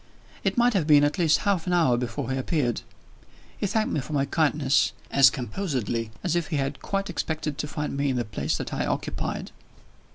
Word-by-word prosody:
It - - 0
must 240 0 +4
have 180 -7 +1
been 145 -2 +7
at 145 +4 +1
least 160 -2 +4
half 190 -4 +1
an 180 - +1
hour 160 -8 +4
before 125 +2 -3
he 130 - -1
appeared. 130 -4 0 0.7
He 205 - -2
thanked 215 +3 0
me - - +1
for 135 +3 -6
my 140 -1 +2
kindness, 145 -2 +2 0.2
as 135 -1 +7
composedly 125 - -3
as 175 -2 0
if 170 -2 0
he 160 - -3
had 135 0 -2
quite 195 0 -2
expected 155 -6 -3
to 150 - -2
find 150 -1 -3
me 140 0 0
in 130 - 0
the 120 -1 -1
place 75 -8 -2
that - - -5
I - - -1
occupied. - - -3
145 Hz, 205 wpm, -26 LUFS, 130-170 Hz, 0.7 s, been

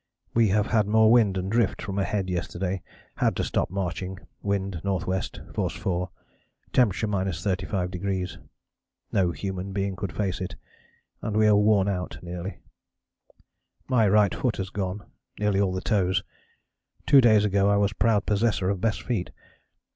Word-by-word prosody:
We 115 -1 +4
have 105 +1 +2
had 110 -3 +2
more 110 +1 +5
wind 110 -5 +4
and 95 +1 -2
drift 115 -3 +1
from 100 -1 -3
ahead 95 0 -1
yesterday; 90 +1 -2 0.4
had - - +2
to - - -1
stop - - 0
marching; 95 0 -3 0.2
wind 100 -2 -1
N.W., 95 -1 -1 0.3
force - - -1
4, 90 0 -2 0.6
temp. 125 -5 +5
35°. 95 -2 -2 0.7
No 90 -3 +2
human 95 +2 -4
being 100 -1 -1
could 95 +1 -4
face 95 -4 -2
it, 95 - -4 0.7
and 110 -1 -2
we 110 - +5
are 105 -1 +6
worn 105 -1 +4
out 90 -3 -3
nearly. 90 +2 -6 1.3
"My 120 -5 +3
right 105 -1 +4
foot 125 -4 -1
has 95 0 -4
gone, 100 0 -3 0.3
nearly 105 -1 +1
all 95 -2 +2
the 95 0 -3
toes 95 -4 +1 0.8
two 140 - +7
days 110 -4 +5
ago 100 0 +2
I 100 - +4
was 100 +1 +2
proud 105 -1 +2
possessor 105 -2 +1
of 95 -2 -3
best 110 0 0
feet.... 110 -8 -2
100 Hz, 155 wpm, -26 LUFS, 95-105 Hz, 1.3 s, two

